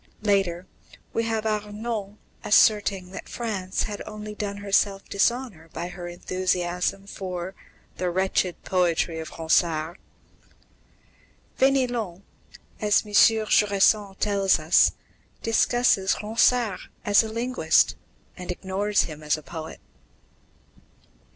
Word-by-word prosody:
Later, 195 -4 +1 0.5
we 230 - 0
have 225 -1 -2
Arnauld 210 0 -3 0.3
asserting 200 -3 +3
that 195 - -9
France 200 -6 -3
had 205 -2 -5
only 215 0 -7
done 205 -1 -4
herself 200 0 0
dishonour 200 -5 -1
by 175 - -4
her 180 -1 -8
enthusiasm 180 +1 -2
for 185 -2 -6 0.4
"the 180 - -1
wretched 185 0 -1
poetry 170 -2 0
of 160 - -6
Ronsard." 160 0 +1 1.6
Fénelon, 245 -9 +1 0.6
as 210 0 +2
M. 210 - -11
Jusserand 210 -2 +4
tells 200 -2 +2
us, 155 +1 +4 0.5
discusses 225 -3 +2
Ronsard 225 -1 +2 0.3
as 205 -1 +5
a 220 - -5
linguist, 230 -7 +2 0.4
and 180 - -9
ignores 195 +3 0
him 155 -2 -8
as 150 0 0
a 155 - -11
poet. 160 0 -8
195 Hz, 105 wpm, -25 LUFS, 180-215 Hz, 1.6 s, as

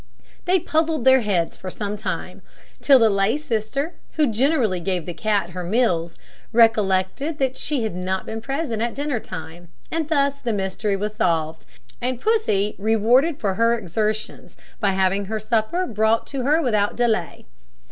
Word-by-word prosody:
They 365 +1 +3
puzzled 315 -4 0
their 260 0 +7
heads 195 -7 0
for 185 - -7
some 205 +2 -4
time, 210 - -5 0.4
till 275 -2 +7
the 225 -3 +5
lay 200 +4 +2
sister 280 +3 -2 0.2
who 310 - +2
generally 240 - +1
gave 180 -1 -2
the 175 - -5
cat 200 -2 -1
her 180 0 -5
meals 175 -5 0 0.4
recollected 225 - +2
that 265 -2 0
she 285 -6 -2
had 220 - -2
not 185 +1 -3
been 225 0 -5
present 270 -3 -3
at 235 0 -1
dinner 285 -4 -2
time; 175 -3 -9 0.2
and 320 -1 -2
thus 280 -2 +1
the 235 -3 -1
mystery 195 +1 -1
was 210 +2 -3
solved, 165 -6 -1 0.3
and 250 0 -2
Pussy 255 - +1
rewarded 235 +9 +3
for 200 -3 0
her 230 +4 +2
exertions 215 +2 -3 0.2
by 200 -3 +1
having 190 +1 +1
her 220 +2 -3
supper 225 - 0
brought 220 - +1
to 275 -2 -4
her 310 +4 +3
without 210 -5 +1
delay. 225 -7 -1
220 Hz, 165 wpm, -22 LUFS, 195-270 Hz, 0.4 s, their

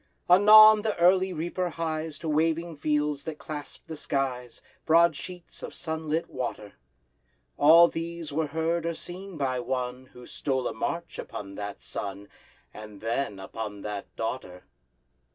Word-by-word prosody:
Anon 215 +3 +9
the 215 -1 -2
early 185 +2 +4
reaper 175 +2 -2
hies 160 -2 -3
To 165 - -7
waving 165 +2 0
fields 150 -1 0
that 160 -2 -5
clasp 150 -2 -8
the 160 - -7
skies, 130 -4 -3 0.2
Broad 165 0 +5
sheets 175 +3 -9
of - - -7
sunlit 160 0 -2
water. 120 -5 -5 0.8
All 165 +3 +8
these 165 -2 -5
were 155 +1 0
heard 160 +2 -1
or 170 - -2
seen 185 +1 -8
by 130 -3 -1
one 125 +1 -3
Who 125 -1 -14
stole 130 -1 -2
a - - -3
march 170 +9 -4
upon 100 -1 -7
that 100 0 -7
sun, 100 0 -6 0.4
And 105 -1 -10
then—upon 105 -3 -4
that 105 -1 -5
Daughter! 110 -6 -5
155 Hz, 140 wpm, -27 LUFS, 125-170 Hz, 0.8 s, Anon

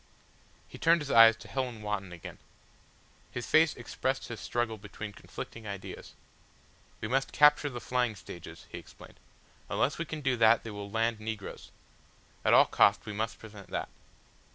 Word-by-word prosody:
He - - -12
turned 165 0 +4
his 145 -2 -4
eyes 115 -1 +8
to - - -13
Helen 125 -5 -3
Wotton 100 -3 -3
again. 85 -2 -9 0.9
His 120 - -5
face 160 -1 +4
expressed 130 +1 -3
his 115 -3 -6
struggle 115 -2 -2
between 105 +1 -8
conflicting 110 +3 -9
ideas. 100 -1 -8 0.9
"We - - -2
must 135 +4 0
capture 150 0 +5
the 120 -3 -6
flying 120 -1 0
stages," 85 -2 -10
he - - -6
explained. - - -15 0.5
"Unless 140 - 0
we 170 - -1
can 155 0 -6
do 130 -2 +1
that 115 0 +5
they 115 - -6
will 100 -1 -7
land 115 +1 0
negroes. 110 -2 -6 0.7
At - - +3
all - - +8
costs - - +3
we 105 - -5
must 110 +2 -2
prevent 105 -3 -12
that." - - -3
115 Hz, 165 wpm, -30 LUFS, 105-130 Hz, 0.9 s, eyes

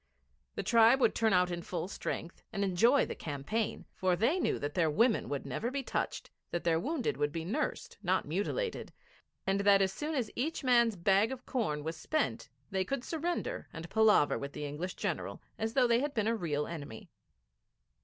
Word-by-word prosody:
The - - -2
tribe 230 +3 +6
would - - +4
turn 225 -1 +2
out 180 -1 +3
in 175 0 -3
full 180 +1 -4
strength 170 -3 -5
and 200 - -1
enjoy 225 +9 +4
the - - -5
campaign, 160 +10 -3
for 185 -1 +1
they 245 - +2
knew - - +1
that 145 0 -4
their 165 -3 +2
women 225 +9 +2
would 140 -1 -3
never 235 - -2
be 275 +1 -3
touched, - - -3 0.2
that 175 - -3
their 165 -1 +2
wounded 280 - -1
would 145 0 0
be 165 0 -4
nursed, 265 - -3
not 185 -4 +1
mutilated, 205 - -2 0.5
and 195 0 +1
that 200 0 +5
as 195 -1 +1
soon 300 +8 -3
as 240 -6 -1
each 310 +5 -2
man's 235 -4 +4
bag 195 +5 +3
of 260 -1 -7
corn 155 - -1
was 160 +2 -3
spent 310 - -1 0.2
they 190 -1 +1
could 270 +6 -3
surrender 345 - -3
and 165 +1 -8
palaver 220 -9 +4
with 140 0 -6
the 150 - -4
English 155 +6 -4
General - - -3 0.2
as 225 +1 -2
though 260 -2 +5
they 235 -1 +4
had 285 +1 -2
been 215 -3 +1
a 230 +1 +2
real 150 -7 -1
enemy. 145 -9 -8
200 Hz, 195 wpm, -32 LUFS, 170-245 Hz, 0.5 s, tribe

